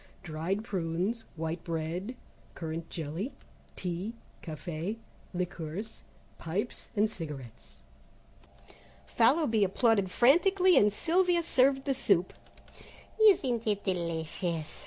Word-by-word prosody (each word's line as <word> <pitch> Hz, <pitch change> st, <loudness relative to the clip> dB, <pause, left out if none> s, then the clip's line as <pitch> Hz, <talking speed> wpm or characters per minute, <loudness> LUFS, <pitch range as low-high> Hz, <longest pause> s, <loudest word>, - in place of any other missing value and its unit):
Dried 175 Hz, +5 st, -2 dB
prunes 190 Hz, +3 st, -2 dB
White 160 Hz, +1 st, -3 dB
bread, 170 Hz, +7 st, -3 dB, 0.4 s
Currant 165 Hz, 0 st, -5 dB
Jelly, 165 Hz, -, -4 dB, 0.4 s
Tea 185 Hz, +5 st, -4 dB, 0.3 s
Café, 170 Hz, +5 st, -4 dB, 0.3 s
Liqueurs, 180 Hz, +2 st, -5 dB, 0.4 s
Pipes 190 Hz, +8 st, -3 dB
and 210 Hz, +1 st, +4 dB
Cigarettes. 150 Hz, -, -8 dB, 1.3 s
Fallowby 235 Hz, -2 st, +3 dB
applauded 200 Hz, 0 st, +2 dB
frantically, 360 Hz, -, +5 dB
and 210 Hz, 0 st, +6 dB
Sylvia 345 Hz, -, +2 dB
served 270 Hz, -3 st, +3 dB
the 275 Hz, -, +2 dB
soup. 195 Hz, -8 st, +2 dB, 0.9 s
"Isn't 260 Hz, -, +4 dB
it 205 Hz, -1 st, 0 dB
delicious?" 170 Hz, -2 st, -2 dB
195 Hz, 95 wpm, -30 LUFS, 165-235 Hz, 1.3 s, and